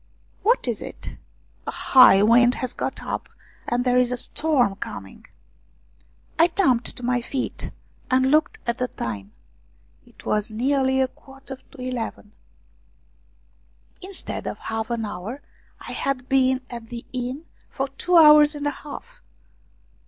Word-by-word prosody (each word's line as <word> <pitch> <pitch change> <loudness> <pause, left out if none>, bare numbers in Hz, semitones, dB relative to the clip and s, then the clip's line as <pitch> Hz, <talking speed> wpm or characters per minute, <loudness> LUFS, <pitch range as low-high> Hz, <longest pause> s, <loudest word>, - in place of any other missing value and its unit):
" - - -36
What 460 - +2
is 235 -4 -2
it? - - -8
" - - -36
" - - -34
A - - 0
high 205 -7 +6
wind 240 +3 +5
has 255 -1 -4
got - - -4
up, - - -4 0.4
and 245 +1 0
there 250 0 +4
is 250 -1 +2
a 250 - -1
storm 250 -7 +1
coming." 95 - -8 1.1
I 335 - +7
jumped 325 -10 +1
to 250 - -9
my 250 0 +1
feet 255 +2 -4 0.4
and 260 0 +3
looked 310 +1 +2
at 235 0 -2
the 250 - 0
time; 105 - -6 0.7
it - - -19
was 210 0 0
nearly 265 +3 +1
a 260 - +2
quarter 270 +1 -12
to 280 - -20
eleven. 245 -4 -5 1.7
Instead 380 0 -4
of - - -4
half 225 0 -4
an 230 -2 -2
hour, 210 +8 -6 0.4
I - - -9
had 260 -2 -2
been 260 -1 +3
at 235 -2 -9
the 235 -1 -7
inn 255 +5 -4 0.2
for 270 - -3
two 345 +6 +1
hours 300 -1 +8
and 290 0 -5
a 290 - +1
half! 475 - -10
255 Hz, 155 wpm, -23 LUFS, 235-280 Hz, 1.7 s, hours